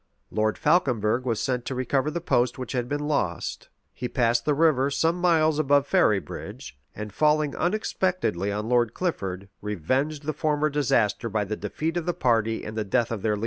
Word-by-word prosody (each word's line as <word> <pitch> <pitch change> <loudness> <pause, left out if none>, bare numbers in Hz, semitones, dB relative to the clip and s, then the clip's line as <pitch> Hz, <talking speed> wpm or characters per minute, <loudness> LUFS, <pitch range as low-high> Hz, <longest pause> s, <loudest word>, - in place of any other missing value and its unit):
[] - - -48
Lord 110 0 0
Falconberg 125 - +2
was 115 -4 0
sent 125 -2 -1
to 130 - -3
recover 130 +3 0
the 170 +3 -3
post 120 -7 +1
which 130 -2 -6
had 125 -2 -2
been 145 0 -2
lost: 100 - -2 0.2
he 125 - -4
passed 120 -2 +1
the 150 - +2
river 145 -3 +3
some 165 +4 +1
miles 160 -3 +3
above 140 -1 +3
Ferrybridge, 110 - -1 0.2
and 105 -1 -6
falling 150 -1 +2
unexpectedly 180 - 0
on 105 +2 -3
Lord 120 -2 +2
Clifford, 100 - -3
revenged 130 - -1
the 155 +1 -2
former 150 0 0
disaster 120 -5 +1
by 105 -1 0
the 110 +2 -3
defeat 160 +9 -3
of 175 - -3
the 175 - 0
party 115 -2 +1
and 110 - -6
the 110 - -1
death 110 +3 0
of 110 -4 -3
their 105 0 +1
leader. - - -6
130 Hz, 190 wpm, -25 LUFS, 110-155 Hz, 0.2 s, river